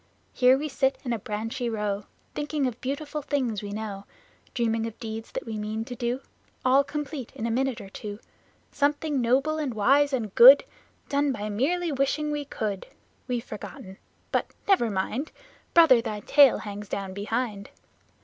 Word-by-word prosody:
Here 255 +1 +5
we 300 +2 -3
sit 270 -1 +1
in 240 - 0
a 230 - -2
branchy 225 +4 -3
row, 210 -2 -2 0.3
Thinking 295 -1 -1
of 250 -2 -3
beautiful 290 +3 -3
things 255 -8 -1
we 205 - -6
know; 205 -2 -5 0.5
Dreaming 230 -2 0
of 225 - -9
deeds 225 -1 -6
that - - -4
we 220 -2 -4
mean 215 +1 -3
to 250 0 -7
do, 245 +1 -2 0.4
All 265 +2 +5
complete, 285 -3 -5
in 225 - -4
a 230 - 0
minute 260 +1 0
or 195 - -9
two 205 +1 -7 0.5
Something 290 -1 0
noble 275 +6 +2
and 275 -6 -2
wise 275 +7 +4
and 225 -7 -2
good, 265 +4 +10 0.4
Done 285 0 +1
by 215 -4 -4
merely 325 +11 0
wishing 285 +2 0
we 295 -1 -2
could. 210 -7 -4 0.4
We've 245 -2 -2
forgotten, 190 -2 -9 0.3
but - - +1 0.2
never 370 - +4
mind, 215 +9 -2 0.4
Brother, 320 -8 +7
thy 210 -3 -4
tail 280 +3 +6
hangs 205 -1 -7
down 195 -1 -4
behind! 205 0 -3
245 Hz, 170 wpm, -26 LUFS, 215-280 Hz, 0.5 s, good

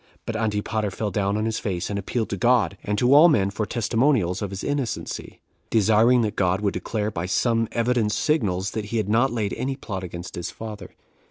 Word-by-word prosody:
But 115 - -4
Antipater 110 -1 -1
fell 100 +2 -3
down 100 0 0
on 110 - -1
his 110 -1 -1
face, 95 -2 -3
and 100 - -1
appealed 110 +3 -2
to - - 0
God 120 0 +3
and 105 0 -1
to 125 +5 +4
all 155 +4 +8
men 100 -10 +2
for 105 +1 -3
testimonials 115 -5 +1
of 100 - -2
his 95 0 -6
innocency, 140 -5 -4 0.3
desiring 115 +3 +4
that 105 0 -2
God 90 -1 +1
would 100 -2 0
declare, 105 +3 -2
by 85 -2 -3
some 115 +3 +1
evident 115 -2 +1
signals, 100 - 0
that 110 -1 -4
he 115 +3 -3
had 110 -3 0
not 120 +5 +3
laid 110 -4 -2
any 135 +1 -2
plot 95 -8 -6
against 85 0 -7
his 85 - -4
father. 110 -2 -8
110 Hz, 205 wpm, -24 LUFS, 100-115 Hz, 0.3 s, all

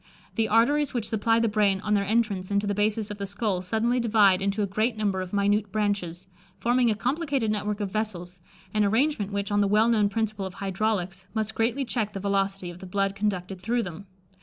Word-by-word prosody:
The 225 -1 +1
arteries 255 +6 +3
which 230 -3 -1
supply 225 +1 +2
the 230 - +2
brain 205 -2 +2
on 210 0 0
their 200 -1 +3
entrance 210 -4 0
into 200 0 +1
the 205 - 0
basis 210 +1 0
of 205 - -7
the 200 - -3
skull 200 -2 -1
suddenly 225 +6 0
divide 210 -5 +4
into 200 +2 0
a - - +2
great 215 +4 -1
number 200 -3 0
of 185 -1 -6
minute 205 0 +1
branches, 195 -4 -1 0.3
forming 240 0 +2
a 215 - +1
complicated 265 +1 0
network 210 0 -2
of 200 -2 -3
vessels, 180 -5 -4 0.3
an 215 -1 +2
arrangement 220 0 +1
which, 200 0 -2
on 205 0 +3
the 200 - +3
well 215 +3 +4
known 210 -3 +3
principle 215 -2 -2
of 190 - -11
hydraulics, 195 -2 -2
must 220 0 -1
greatly 235 +5 0
check 225 -4 -2
the 195 - -4
velocity 195 -2 -1
of 175 - -12
the 190 - -9
blood 195 +1 0
conducted 190 -2 -3
through 235 +4 0
them. 180 +2 -8
205 Hz, 210 wpm, -26 LUFS, 195-225 Hz, 0.3 s, divide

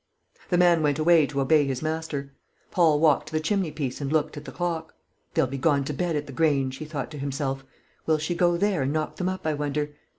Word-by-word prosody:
The 175 - +2
man 175 -2 +5
went 145 -2 +1
away 160 -1 +5
to 140 -1 -2
obey 150 +2 +4
his 130 +1 -3
master. 155 -3 -3 0.4
Paul 160 -4 +4
walked 155 -3 +3
to - - -10
the 155 - +2
chimneypiece 155 -6 -2
and 140 0 -2
looked 155 -2 +1
at 145 0 -8
the - - -7
clock. 165 -2 -3 0.4
"They'll - - +4
be 135 +1 -5
gone 140 0 +2
to 150 - -4
bed 175 +2 -1
at 145 0 -2
the 140 - -10
Grange," 135 -4 +1
he 155 - -6
thought 150 -3 -5
to 150 - -7
himself. 135 -1 -3 0.4
"Will 160 -1 +4
she 155 +3 -2
go 175 0 +2
there 195 -4 +1
and 135 +1 0
knock 155 -1 -2
them 180 0 -1
up, 185 -2 -5
I 155 - +1
wonder? 145 0 -2
155 Hz, 235 wpm, -26 LUFS, 140-165 Hz, 0.4 s, man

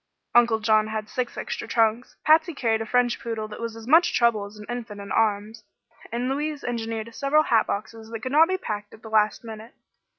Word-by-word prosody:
Uncle 235 -2 +5
John 215 0 +3
had 215 -1 -4
six 250 -2 -3
extra - - -4
trunks, 225 +1 +1
Patsy 315 +1 +4
carried 225 -4 0
a 225 - -4
French 245 0 +2
poodle 225 -2 -4
that 210 - -9
was 230 -1 -5
as 225 -1 -10
much 325 +7 +4
trouble 235 -4 +2
as 205 +1 -12
an 210 - -10
infant 235 -4 -6
in 200 0 -8
arms, 215 0 0 0.5
and 240 +2 -2
Louise 295 +2 -2
engineered 230 -1 -4
several 285 +5 +2
hat 230 -6 +2
boxes 220 +2 -5
that 225 -1 -6
could 255 - -4
not 315 +3 +6
be 375 +1 0
packed 210 - -6
at 220 - -21
the 220 - -9
last 215 0 +2
minute. 225 +3 -10
225 Hz, 210 wpm, -25 LUFS, 215-245 Hz, 0.5 s, not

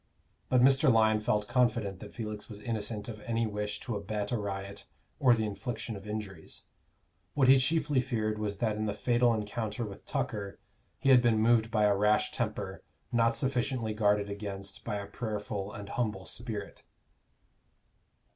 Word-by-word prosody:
But 125 -1 +4
Mr. 135 +2 +6
Lyon 110 -1 +4
felt 105 -1 0
confident 120 -6 +1
that 105 - -9
Felix 105 -2 -6
was 105 -2 -8
innocent 105 -1 -3
of 110 -3 -6
any 115 0 0
wish 105 -1 -3
to 120 - -3
abet 105 0 -3
a 120 - +1
riot 100 0 -5 0.3
or 130 -5 +6
the 110 -1 -1
infliction 110 +1 -4
of 100 +1 -9
injuries; 105 -6 -6 0.7
what 135 -3 +4
he 135 +1 +8
chiefly 145 -1 +2
feared 110 -4 -1
was 105 -2 -2
that 105 +1 0
in 110 0 -1
the 100 - -2
fatal 120 -1 +3
encounter 110 +1 -2
with 100 -2 -10
Tucker 110 -8 -3 0.4
he 135 - 0
had 130 -2 +8
been 120 -2 +3
moved 110 0 +4
by 110 -2 +2
a 105 -1 +4
rash 105 +2 +3
temper, - - -3 0.3
not 115 -1 +3
sufficiently 125 -4 0
guarded 105 -1 +2
against 100 -1 -6
by - - -3
a 100 -1 -3
prayerful 105 -2 -4
and 100 -1 -8
humble 105 -6 -2
spirit. 110 -4 -5
110 Hz, 165 wpm, -30 LUFS, 105-120 Hz, 0.7 s, he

